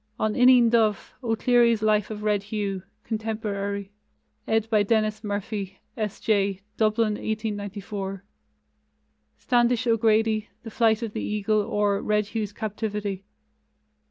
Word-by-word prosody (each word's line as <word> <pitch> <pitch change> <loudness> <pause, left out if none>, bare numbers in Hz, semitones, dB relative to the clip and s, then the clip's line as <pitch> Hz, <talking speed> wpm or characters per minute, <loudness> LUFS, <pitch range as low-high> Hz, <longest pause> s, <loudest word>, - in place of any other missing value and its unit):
On 215 0 +1
Ineen 250 -2 +6
Dubh: 220 -3 +2
O'Clery's 235 -1 +3
Life 215 -1 +2
of 210 -1 -6
Red 210 -1 +1
Hugh 200 -2 -3 0.2
(contemporary), 205 -3 -3 0.6
ed. 220 0 +1
by 220 -2 +3
Denis 215 +1 +1
Murphy, 205 -1 -4 0.2
S. 215 -4 -3
J. 200 -3 +1
(Dublin, 215 0 +2
1894); 205 -2 -4 1.1
Standish 245 0 +2
O'Grady, 220 -1 +2
The 225 - -8
Flight 225 0 +2
of 220 -2 -4
the - - -3
Eagle, 210 0 0
or 205 -2 0
Red 210 -1 0
Hugh's 215 -3 -2
Captivity. 210 -2 -4
215 Hz, 120 wpm, -25 LUFS, 205-225 Hz, 1.1 s, Ineen